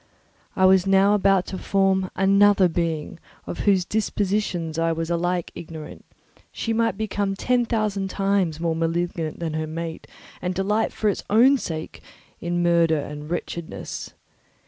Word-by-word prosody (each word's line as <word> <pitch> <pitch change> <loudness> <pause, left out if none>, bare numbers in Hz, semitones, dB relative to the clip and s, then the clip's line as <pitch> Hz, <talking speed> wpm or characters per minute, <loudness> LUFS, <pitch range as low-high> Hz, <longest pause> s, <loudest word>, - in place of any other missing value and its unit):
I 190 - +3
was 190 0 +5
now 195 +1 +5
about 195 -2 +3
to 190 - -3
form 190 -1 +1
another 200 0 +5
being 165 -1 -2 0.3
of - - -6
whose 190 -3 +3
dispositions 195 -6 -1
I 165 0 +2
was 165 +1 -3
alike 175 0 -1
ignorant; 160 -2 -9 0.5
she 225 - -2
might 230 0 +1
become 205 -2 -1
ten 245 +4 +1
thousand 210 -4 -1
times 195 -5 0
more 165 -1 0
malignant 165 -1 -2
than 165 -2 -3
her 155 0 -2
mate 165 +1 -6 0.3
and 180 0 -2
delight, 210 +4 0
for 215 - -2
its 205 - 0
own 255 +6 +5
sake, 160 -5 -6 0.4
in 175 0 -1
murder 170 -2 +3
and 150 +1 -6
wretchedness. 170 -1 -5
180 Hz, 145 wpm, -23 LUFS, 165-200 Hz, 0.5 s, was